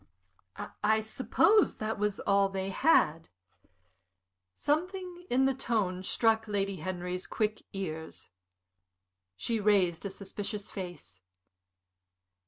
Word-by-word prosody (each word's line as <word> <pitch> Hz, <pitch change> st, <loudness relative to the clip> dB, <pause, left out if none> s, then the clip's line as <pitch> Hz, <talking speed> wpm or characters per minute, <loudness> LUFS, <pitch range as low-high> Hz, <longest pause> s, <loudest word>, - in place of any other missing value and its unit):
"I 220 Hz, +1 st, +4 dB
suppose 315 Hz, -, +3 dB
that 215 Hz, 0 st, -3 dB
was 210 Hz, -1 st, 0 dB
all 200 Hz, -1 st, +3 dB
they 190 Hz, 0 st, -3 dB
had." 165 Hz, -, +3 dB, 1.2 s
Something 355 Hz, -, -2 dB
in 260 Hz, +2 st, +3 dB
the 270 Hz, -, +3 dB
tone 210 Hz, -8 st, -1 dB
struck 225 Hz, +3 st, +2 dB
Lady 200 Hz, -2 st, -1 dB
Henry's 180 Hz, 0 st, -4 dB
quick 215 Hz, -1 st, -1 dB
ears. 160 Hz, -, -6 dB, 1.0 s
She 225 Hz, -, -1 dB
raised 195 Hz, -5 st, +3 dB
a 200 Hz, -, -2 dB
suspicious 200 Hz, +2 st, -6 dB
face. 175 Hz, -, -8 dB
205 Hz, 100 wpm, -30 LUFS, 185-225 Hz, 1.2 s, I